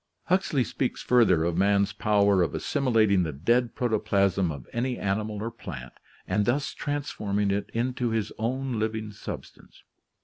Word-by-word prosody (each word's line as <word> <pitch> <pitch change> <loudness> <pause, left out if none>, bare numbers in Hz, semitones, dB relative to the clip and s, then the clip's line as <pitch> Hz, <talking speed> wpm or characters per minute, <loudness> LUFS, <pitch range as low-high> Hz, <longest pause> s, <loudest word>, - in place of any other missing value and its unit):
Huxley 180 -7 +1
speaks, 130 +1 -3
further, 110 -10 +4
of 85 0 0
man's 100 0 +3
power 100 -3 +3
of 85 - 0
assimilating 115 -9 +2
the 80 -3 -1
dead 115 - +1
protoplasm 100 -6 +1
of 70 -4 -8
any 125 +1 -1
animal 105 +1 -2
or 115 - -3
plant 60 - -8 0.3
and 100 +3 +1
thus 135 +4 0
transforming 105 -9 -2
it 100 +1 -2
into 125 +1 -1
his 110 -2 -1
own 125 +1 -1
living 110 -1 -2
substance. 105 - -9
110 Hz, 145 wpm, -27 LUFS, 100-120 Hz, 0.3 s, further